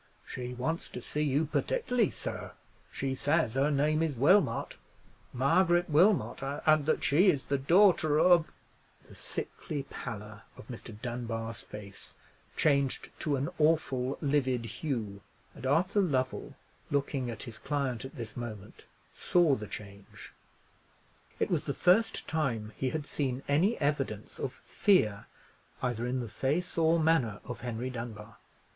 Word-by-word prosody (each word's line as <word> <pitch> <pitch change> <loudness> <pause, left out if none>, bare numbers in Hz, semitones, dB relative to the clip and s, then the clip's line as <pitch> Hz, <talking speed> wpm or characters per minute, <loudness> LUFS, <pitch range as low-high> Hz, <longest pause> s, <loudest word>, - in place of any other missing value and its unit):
"She 125 -1 -6
wants 160 +7 -2
to - - -6
see 150 +5 -3
you 150 +1 +2
particularly, 250 - +1
sir; - - -5 0.4
she 135 -1 -2
says 140 -3 +1
her 135 +3 +2
name 150 +2 +2
is 155 -6 -1
Wilmot—Margaret 170 - +1
Wilmot; 180 +4 +3 0.2
and 155 -1 +4
that 155 - +1
she 175 +7 +5
is 145 -7 +1
the 140 -1 0
daughter 165 -1 +4
of——" 175 -2 +5 0.6
The - - -14
sickly 145 -3 -5
pallor 105 -3 -7 0.2
of - - -12
Mr. 115 -3 -9
Dunbar's 115 -2 -4
face 100 -2 -10 0.4
changed 140 -3 +1
to 150 -3 0
an 140 +4 -1
awful 140 -4 +2
livid 130 -4 +1
hue: 115 -5 -4 0.3
and 130 - -6
Arthur 180 +8 +3
Lovell, 130 -8 -1 0.3
looking 140 -3 -1
at 115 -3 -6
his 115 -3 -9
client 135 -5 -2
at 135 - -9
this 115 -5 -7
moment, 110 -5 -8 0.3
saw 175 -5 +3
the 105 -5 -3
change. 100 -1 -10 1.1
It - - 0
was - - 0
the - - -2
first 185 +6 +3
time 115 -9 -1
he 130 - -1
had 155 +1 -3
seen 135 -3 -2
any 170 +11 +2
evidence 135 -8 -2
of 130 - -2
fear 110 - +2 0.6
either 120 -1 -1
in 130 +1 -1
the 120 - -5
face 145 - -1
or 165 0 +3
manner 155 -10 +2
of 125 - -7
Henry 120 +1 -3
Dunbar. 115 -3 -7
135 Hz, 140 wpm, -30 LUFS, 120-155 Hz, 1.1 s, she